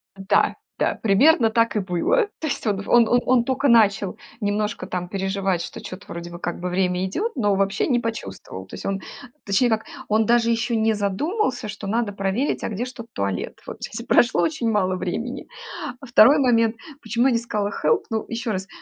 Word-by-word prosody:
Да 195 Hz, +1 st, +2 dB, 0.2 s
да, -, -, +2 dB
примерно 225 Hz, +4 st, +4 dB
так 230 Hz, +1 st, +2 dB
и -, -, +2 dB
было. 195 Hz, -, +1 dB
То -, -, -4 dB
есть 275 Hz, -6 st, -3 dB
он 200 Hz, -1 st, -1 dB
он 240 Hz, -1 st, +5 dB
он 245 Hz, +2 st, +4 dB
он 250 Hz, -2 st, +4 dB
тока 270 Hz, +3 st, 0 dB
начал 210 Hz, -4 st, +4 dB, 0.3 s
немножко 210 Hz, 0 st, -1 dB
там 180 Hz, -1 st, -4 dB
переживать, 190 Hz, -2 st, -1 dB
что 225 Hz, -, -8 dB
чё-то 185 Hz, -3 st, -9 dB
вроде 170 Hz, 0 st, -7 dB
бы 170 Hz, -, -8 dB
как 175 Hz, 0 st, -4 dB
бы 180 Hz, +1 st, -3 dB
время 180 Hz, 0 st, 0 dB
идёт, 400 Hz, -, -2 dB
но 205 Hz, -6 st, +2 dB
вообще 195 Hz, +1 st, +1 dB
не 250 Hz, -4 st, +2 dB
почувствовал. 95 Hz, -, -6 dB
То -, -, -9 dB
есть -, -, -9 dB
он, 195 Hz, -1 st, -2 dB, 0.4 s
точнее 210 Hz, +5 st, +2 dB
как, 220 Hz, 0 st, 0 dB, 0.2 s
он 215 Hz, 0 st, +2 dB
даже 235 Hz, -1 st, +3 dB
ещё 230 Hz, +1 st, 0 dB
не 220 Hz, 0 st, +2 dB
задумался, 245 Hz, -, -1 dB
что 210 Hz, -1 st, -7 dB
надо 220 Hz, 0 st, 0 dB
проверить, 195 Hz, +7 st, -1 dB
а -, -, -1 dB
где 220 Hz, +3 st, -3 dB
ж 255 Hz, -, -8 dB
тут 235 Hz, -1 st, -9 dB
туалет. 100 Hz, -2 st, -3 dB
Вот -, -, -7 dB
здесь 225 Hz, +2 st, -5 dB
и -, -, -11 dB
прошло 245 Hz, -1 st, +4 dB
очень 305 Hz, -8 st, 0 dB
мало 185 Hz, -3 st, +1 dB
времени. 230 Hz, +9 st, -4 dB, 0.5 s
А 270 Hz, -, -10 dB
2 245 Hz, +4 st, +6 dB
момент, 230 Hz, -4 st, +3 dB, 0.3 s
почему 235 Hz, +2 st, +1 dB
я 270 Hz, -, +4 dB
не 230 Hz, -, +2 dB
сказала 210 Hz, -3 st, -2 dB
help? 155 Hz, -, +3 dB
Ну, 220 Hz, -1 st, -2 dB
ещё 230 Hz, -1 st, -3 dB
раз, 190 Hz, -1 st, -3 dB
220 Hz, 205 wpm, -23 LUFS, 195-240 Hz, 0.5 s, 2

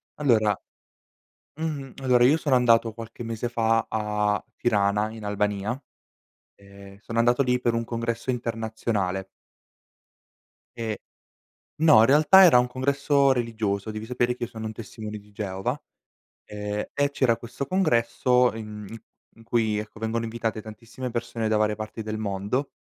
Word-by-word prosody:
Allora, 110 Hz, -8 st, +2 dB, 1.0 s
mhmm 145 Hz, -5 st, -4 dB
allora, 125 Hz, -2 st, +4 dB
io 145 Hz, +6 st, +5 dB
sono 145 Hz, -5 st, +1 dB
andato 115 Hz, -2 st, +4 dB
qualche 115 Hz, +1 st, -10 dB
mese 115 Hz, +1 st, -3 dB
fa 115 Hz, -1 st, +1 dB
a 105 Hz, -1 st, 0 dB
Tirana, 105 Hz, -2 st, +1 dB
in 110 Hz, -1 st, -9 dB
Albania, 105 Hz, +3 st, -1 dB, 0.8 s
ehm, 100 Hz, 0 st, -14 dB
sono 115 Hz, +2 st, -5 dB
andato 120 Hz, +3 st, +3 dB
lì 125 Hz, 0 st, +1 dB
per 120 Hz, -2 st, +1 dB
un 115 Hz, -, -1 dB
congresso 115 Hz, +1 st, -3 dB
internazionale. 110 Hz, -5 st, -2 dB, 1.5 s
E 110 Hz, -3 st, -4 dB, 0.8 s
no, 155 Hz, -7 st, +6 dB
in 115 Hz, -, +6 dB
realtà 155 Hz, +8 st, +7 dB
era 165 Hz, -8 st, +7 dB
un 125 Hz, -, +3 dB
congresso 140 Hz, +2 st, +2 dB
religioso, 110 Hz, -4 st, -2 dB
devi 110 Hz, +1 st, -6 dB
sapere 125 Hz, 0 st, 0 dB
che 125 Hz, -, -3 dB
io -, -, -7 dB
sono 110 Hz, -2 st, -7 dB
un 110 Hz, -, -4 dB
testimone 110 Hz, -1 st, -7 dB
di 105 Hz, 0 st, -19 dB
Geova, 100 Hz, +6 st, -3 dB, 0.7 s
ehm, 105 Hz, 0 st, -4 dB
e 145 Hz, 0 st, +1 dB
c'era 120 Hz, -5 st, +2 dB
questo 120 Hz, +4 st, -6 dB
congresso 125 Hz, -6 st, +2 dB
in 105 Hz, -2 st, -7 dB
i 115 Hz, -, -9 dB, 0.3 s
in 115 Hz, -, -17 dB
cui, 115 Hz, -2 st, 0 dB
ecco, 105 Hz, +1 st, -7 dB
vengono 110 Hz, +1 st, -1 dB
invitate 115 Hz, -1 st, -3 dB
tantissime 115 Hz, +4 st, -8 dB
persone 115 Hz, -1 st, -3 dB
da 110 Hz, -, +2 dB
varie 105 Hz, 0 st, +2 dB
parti 110 Hz, +1 st, -6 dB
del 110 Hz, 0 st, -4 dB
mondo, 105 Hz, +6 st, -2 dB
115 Hz, 150 wpm, -25 LUFS, 105-125 Hz, 1.5 s, realtà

